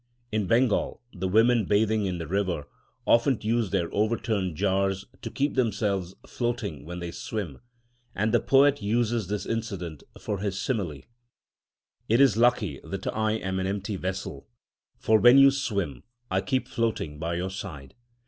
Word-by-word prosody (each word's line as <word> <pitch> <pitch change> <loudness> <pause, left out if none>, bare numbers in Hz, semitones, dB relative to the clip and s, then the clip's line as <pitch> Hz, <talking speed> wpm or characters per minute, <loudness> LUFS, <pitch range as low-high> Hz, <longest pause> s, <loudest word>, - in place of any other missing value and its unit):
In 105 -3 0
Bengal 115 +2 +2
the 95 -1 -3
women 115 +3 +4
bathing 105 +1 +2
in 90 -1 -2
the 85 - -5
river 90 -3 -1 0.4
often 120 +2 +4
use 110 -1 0
their 90 -3 0
overturned 105 -3 0
water - - -13
jars 95 0 0 0.2
to - - -5
keep 140 +2 -1
themselves 100 -6 0
floating 120 - -3
when 90 +2 -6
they 85 -1 -5
swim, 105 - -5 0.6
and 105 +2 0
the - - +5
poet 140 0 +4
uses 115 0 0
this 100 0 -3
incident 100 - -4 0.2
for 105 -3 -3
his 95 -1 -2
simile: 90 - -2 1.1
It 115 +3 +4
is 135 -7 +6
lucky 115 - +2
that 95 -1 -6
I 110 0 +1
am 95 -3 -2
an 95 - -1
empty 100 +1 -3
vessel, 95 -6 -5 0.5
For 110 0 +3
when 120 +3 +8
you 135 0 +8
swim, 100 - -2 0.3
I 95 0 +2
keep 125 +7 -1
floating 110 - -2
by 85 +1 -2
your 90 +2 -2
side. 80 -9 -8
100 Hz, 160 wpm, -27 LUFS, 95-115 Hz, 1.1 s, when